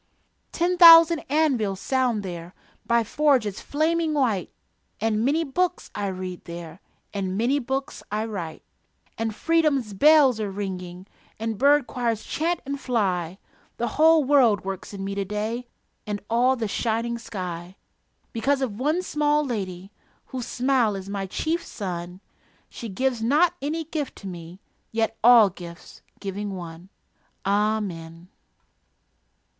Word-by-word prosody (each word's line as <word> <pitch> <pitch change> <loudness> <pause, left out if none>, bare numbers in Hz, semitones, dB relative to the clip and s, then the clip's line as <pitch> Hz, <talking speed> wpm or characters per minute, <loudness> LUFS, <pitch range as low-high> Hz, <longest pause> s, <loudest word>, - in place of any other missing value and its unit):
Ten 355 +1 0
thousand 330 -1 +9
anvils 260 -11 +1
sound 250 -5 0
there 175 -1 -7 0.3
By 235 0 +3
forges 250 -5 +1
flaming 315 +1 0
white, 225 - 0 0.5
And 220 0 0
many 300 +6 +2
books 355 +5 -1
I 205 -1 -2
read 185 -1 -6
there, 170 0 -9 0.3
And 190 -2 -2
many 250 +6 +2
books 265 +1 -4
I 215 +1 -1
write; 180 -8 -6 0.6
And 225 -1 -2
freedom's 300 -9 +1
bells 280 +1 +5
are 210 -2 -2
ringing, 185 -2 -6 0.3
And 225 0 -3
bird 285 0 +5
choirs 235 -4 -2
chant 335 +2 -1
and 280 +1 -4
fly 190 -9 -1 0.4
The 240 0 -1
whole 320 +4 +5
world 250 -9 +4
works 195 -1 -5
in 195 -1 -6
me 200 - -3
to 200 0 -1
day 215 +5 -3 0.4
And 205 -1 -2
all 250 +3 +3
the 230 -3 -2
shining 230 +2 -1
sky, 180 -5 -6 0.6
Because 270 +4 +1
of 220 -4 -4
one 310 +7 +1
small 300 -2 +1
lady 195 -6 -5 0.3
Whose 255 -3 -6
smile 250 -4 +1
is 195 0 -7
my 200 -1 -3
chief 325 - -2
sun. 180 -2 -6 0.5
She 230 - -7
gives 250 +3 -1
not 305 +9 +3
any 310 +4 -2
gift 305 -3 -4
to 195 - -9
me 175 +1 -9 0.3
Yet 225 0 0
all 230 -4 +7
gifts, 170 -1 -11 0.2
giving 200 0 -4
one.... 170 0 -9 0.6
Amen. 195 -5 -1
225 Hz, 140 wpm, -24 LUFS, 195-280 Hz, 0.6 s, thousand